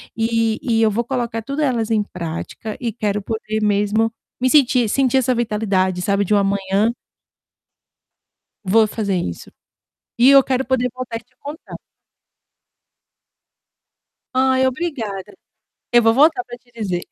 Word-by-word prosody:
e 225 0 0
e 225 -3 +1
eu 220 - +3
vou 230 +4 -1
colocar 240 -2 -3
tudo 275 +6 -4
elas 240 -6 0
em 215 -2 +2
prática 180 +4 -6
e 235 -3 -2
quero 210 -2 -2
poder 220 +1 -3
mesmo 210 +2 +1 0.3
me 255 +1 +2
sentir 255 -4 +4
sentir 265 +2 +2
essa 255 -1 +2
vitalidade 200 -5 0
sabe 200 0 +1
de 200 - -1
uma 200 - +3
manhã 200 +3 +1 1.7
vou 215 +3 +4
fazer 205 -3 -2
isso. 85 - -5 0.7
E 245 +3 +6
eu 275 -1 +7
quero 260 0 -1
poder 250 0 0
voltar 245 -3 -5
te 245 +2 -28
contar. 295 +3 -9 2.6
Ai 260 0 +3
obrigada. 250 - -4 0.6
Eu 240 0 +6
vou 225 0 +4
voltar 285 -1 +4
pra 240 -1 -9
te 245 0 -30
dizer. 200 -6 -3
225 Hz, 140 wpm, -20 LUFS, 205-255 Hz, 2.6 s, eu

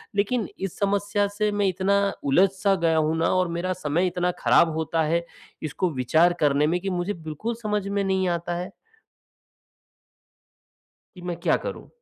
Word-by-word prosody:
लेकिन 210 +2 0
इस 195 -2 -4
समस्या 205 0 +1
से 210 0 +1
मैं 205 -1 +1
इतना 190 +2 +1 0.3
उलझ 175 +8 +4
सा 195 +1 +2
गया 165 -3 +1
हूँ 155 0 +2
ना 165 - +2
और 185 -1 +2
मेरा 185 +2 -1
समय 175 +1 0
इतना 180 0 0
खराब 170 - +4
होता 160 0 0
है 170 +2 0 0.4
इसको 160 +4 -1
विचार 155 +7 +3
करने 145 0 +3
में 175 +3 +1
कि 195 - -2
मुझे 180 +2 -1
बिल्कुल 165 +7 -5
समझ 210 -2 -1
में 200 0 0
नहीं 190 -1 +1
आता 170 0 -2
है। 180 +3 -5 2.5
कि 180 - -11
मैं 175 - -2
क्या - - +3
करूँ? - - -7
180 Hz, 170 wpm, -25 LUFS, 165-200 Hz, 2.5 s, उलझ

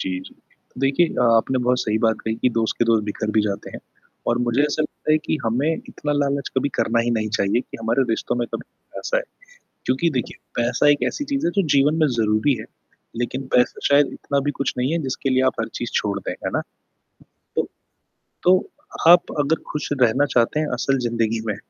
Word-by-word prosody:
जी, 90 -1 -2
जी। - - -13 0.5
देखिए 135 +5 +3
अ, 125 - -1
आपने 130 +3 +1
बहुत 125 0 +2
सही 110 0 0
बात 110 -1 +2
कही 110 0 -1
कि - - +5
दोस्त 110 -1 +1
के 120 - +3
दोस्त 110 -2 +3
बिखर 105 +1 -3
भी - - +6
जाते 100 -2 -3
हैं - - -8 0.5
और - - +1
मुझे 120 +4 +2
ऐसा 150 +1 +1
लगता 155 0 -2
है 155 - +5
कि, 155 - -2
हमें 135 +8 +1
इतना 145 - -3
लालच 140 -1 0
कभी 130 +2 +2
करना 115 +1 +2
ही - - +2
नहीं 110 -1 -1
चाहिए 100 +4 +2
कि - - -10
हमारे 115 +4 +2
रिश्तों 115 - -1
में - - -2
कभी - - -3 0.3
पैसा - - -1
आए। - - +1 0.6
क्योंकि 135 +7 +2
देखिए, 125 - -4 0.2
पैसा 125 +5 +3
एक 145 0 +3
ऐसी 290 - -5
चीज़ 275 0 0
है, 170 - +2
जो 200 - +6
जीवन 140 +3 +4
में 155 - +5
ज़रूरी 110 +5 +2
है, 110 - -7 0.6
लेकिन 130 +2 -3
पैसा 125 0 +3
शायद 140 0 +5
इतना 140 - -1
भी - - +2
कुछ 140 - 0
नहीं 125 +3 0
है 170 - +1
जिसके 135 +1 -2
लिए 130 0 +3
आप - - -12
हर 115 - -2
चीज़ 120 - -4
छोड़ 100 -1 -2
दें, - - -4
है - - +1
ना? - - +1 1.0
तो - - +1 0.8
तो, 185 - +4 0.4
आप 175 0 +6
अगर 150 +2 +2
खुश 150 - -3
रहना 125 +3 +4
चाहते 120 +5 +3
हैं 155 - 0
असल 135 +2 0
जिंदगी 115 -1 0
में, 105 -3 -1
130 Hz, 215 wpm, -22 LUFS, 115-145 Hz, 1.0 s, भी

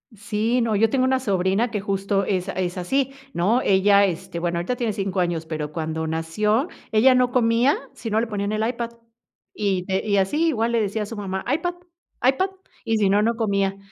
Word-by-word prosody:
Sí, 215 +4 0
no. 230 -2 +1
Yo 220 +2 +3
tengo 255 0 +2
una 260 0 +1
sobrina 195 +2 +1
que, 210 - -1
justo, 195 0 -1
es 190 -1 -1
a - - -3
es 180 0 -2
así, 265 +9 0 0.2
¿no? 210 +9 +2
Ella, 200 0 +4
este, 170 -2 -4
bueno, 170 0 -1
ahorita 185 +9 -2
tiene 235 -3 -1
5 195 -2 -1
años, 170 -2 -1
pero 155 -2 -4
cuando 160 0 -3
nació, 210 - 0 0.2
ella 255 +4 +5
no 250 -1 +3
comía, 240 +3 +3 0.2
si 230 - -6
no 215 - +2
le 235 - -1
ponían 205 -1 -2
el 215 +1 0
iPad. 235 -1 -3 0.6
Y 190 -3 -1
n 190 0 0
y 200 -2 +2
así, 295 +13 +2
igual 235 -6 0
le 230 - +3
decía 210 +1 -1
a - - -4
su 225 +2 -7
mamá: 190 -2 -4
"iPad, 350 +3 -1 0.5
iPad", 370 +9 +2 0.3
y 225 - 0
si 205 -2 +2
no, 205 +1 +4
no 230 +1 +1
comía. 200 -3 0
210 Hz, 210 wpm, -23 LUFS, 190-235 Hz, 0.6 s, ella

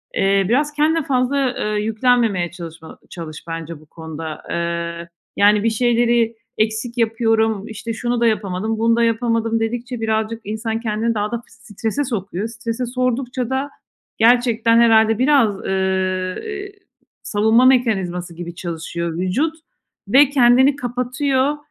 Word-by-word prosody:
Eee, 195 0 +2
biraz 290 +5 +1
kendine 310 +2 +2
fazla, 265 0 0
eee, 210 0 -1
yüklenmemeye 220 -5 +1
çalışma 165 -2 -10
ba - - -13
çalış 160 -3 -8
bence 165 -1 -6
bu 155 - -19
konuda. 160 0 -8
Eee, 170 0 -3 0.3
yani, 205 +1 +4
bir 230 - +3
şeyleri 235 0 +2 0.2
eksik 220 +3 -1
yapıyorum, 225 -2 +1
işte, 225 +1 -6
"şunu 240 +1 -2
da 235 - +4
yapamadım, 215 0 -1
bunu 230 +1 +3
da 235 - +2
yapamadım" 230 0 +1
dedikçe 240 +1 -3
birazcık 220 +1 -1
insan 220 +2 -3
kendini 225 0 -1
daha 210 -1 -2
da 235 - -1
f - - -35
strese 230 +2 -4
sokuyor. 205 -5 -3
Strese 230 +2 -4
soktukça 250 0 -2
da 265 +2 -1 0.5
gerçekten, 230 -1 +4
herhâlde, 225 -1 +4
biraz, 255 -7 +2
eee, 190 -1 -1
eee, 405 -2 -6 0.5
savunma 220 +4 +3
mekanizması 190 -9 +1
gibi 170 0 -7
çalışıyor 170 -1 -4
vücut 200 - 0 0.5
ve 270 +6 +6
kendini 265 0 +5
kapatıyor. 260 +2 -1
225 Hz, 140 wpm, -20 LUFS, 195-245 Hz, 0.5 s, ve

